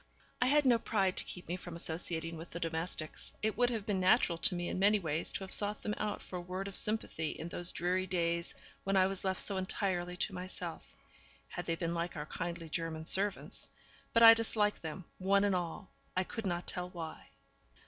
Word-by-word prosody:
I 250 - +4
had 295 +2 +4
no 240 -3 +5
pride 195 -5 +1
to - - 0
keep 180 - -8
me 175 - -1
from 175 -2 -8
associating 165 0 +1
with 165 +1 -8
the 170 - -6
domestics; 165 -1 -3
it 220 0 +1
would 245 +2 +3
have 225 -4 -3
been 205 -3 0
natural 185 -2 +4
to 180 - +2
me 175 0 -2
in - - -2
many 205 +2 +5
ways 160 -4 -1
to - - -3
have 190 - -8
sought 210 0 0
them 210 - -1
out 210 -1 -2
for 180 - -6
a - - -4
word 185 +2 -4
of 195 - -7
sympathy 210 -7 +1
in 165 - -6
those 175 0 +2
dreary 185 +2 0
days 170 -1 0 0.3
when 195 0 +1
I 185 - +6
was 195 0 0
left 190 -1 0
so 200 - +4
entirely 185 -2 -1
to 195 - +2
myself, 180 -2 -6 0.5
had - - -6
they 165 - +1
been 170 0 -2
like 170 +1 -2
our 150 - -3
kindly 170 +1 -4
German 160 0 -3
servants. 200 +4 0 0.4
But 230 - +5
I 225 0 +12
disliked 220 -2 +1
them, 160 +3 -6
one 195 +1 +3
and 200 -1 +3
all; 180 +3 -4 0.3
I 185 - +3
could 220 +2 -5
not 175 -1 -2
tell 180 0 -3
why. 165 -3 -7
185 Hz, 215 wpm, -33 LUFS, 170-200 Hz, 0.5 s, I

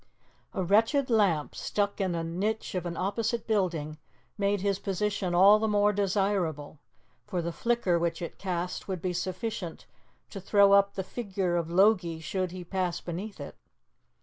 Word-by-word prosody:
A 190 - 0
wretched 225 - +2
lamp, 190 -10 +2
stuck 205 0 -2
in 185 -3 0
a 165 - -2
niche 195 +7 -2
of 180 -2 -2
an 170 - -5
opposite 220 +4 -1
building, 170 -8 -1 0.4
made 200 -1 0
his 200 -1 0
position 195 -2 -1
all 200 +4 +7
the 220 - 0
more 210 0 +3
desirable, 190 -7 -1 0.5
for 190 -4 -2
the 170 0 -2
flicker 230 -4 +1
which 165 -1 -1
it 170 - -7
cast 180 -2 -3
would 190 -2 -3
be 180 +2 -2
sufficient 185 0 -4 0.5
to 195 - -7
throw 200 +1 +5
up 200 0 +4
the 190 - -2
figure 190 -5 -2
of 170 -1 -1
Logie 180 -3 +3
should 185 +3 -2
he 180 +1 -7
pass 180 -1 -2
beneath 190 +5 -6
it. - - -8
190 Hz, 165 wpm, -28 LUFS, 175-205 Hz, 0.5 s, all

